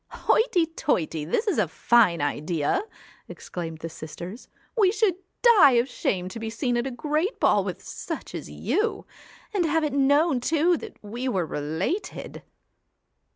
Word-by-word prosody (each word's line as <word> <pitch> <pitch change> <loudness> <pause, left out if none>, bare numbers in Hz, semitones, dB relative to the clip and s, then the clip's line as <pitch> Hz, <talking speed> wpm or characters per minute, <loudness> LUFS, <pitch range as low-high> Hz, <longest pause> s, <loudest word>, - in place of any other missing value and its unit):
'Hoity 380 -7 +2
toity! 175 - -1
this 300 - 0
is 400 - +1
a 200 - +2
fine 170 -1 +3
idea!' 150 - 0 0.5
exclaimed 165 -2 -7
the 165 - -4
sisters. 170 +7 -9
' - - -36
We 385 -3 +5
should 420 -2 +2 0.3
die 400 - +7
of 240 +1 +3
shame 185 -7 -2
to 225 - -7
be 225 0 -4
seen 245 +2 -1
at 240 +2 0
a - - -2
great 305 - -1
ball - - +4
with - - -5
such - - -6
as - - -6
you 440 +2 -1 0.5
and 390 -4 +2
have 320 0 +1
it 300 -3 -1
known 285 +1 +3
too 325 +6 +2
that 445 - -10
we 235 +5 -4
were 185 -8 0
related.' 160 - -3
255 Hz, 160 wpm, -25 LUFS, -, 0.5 s, die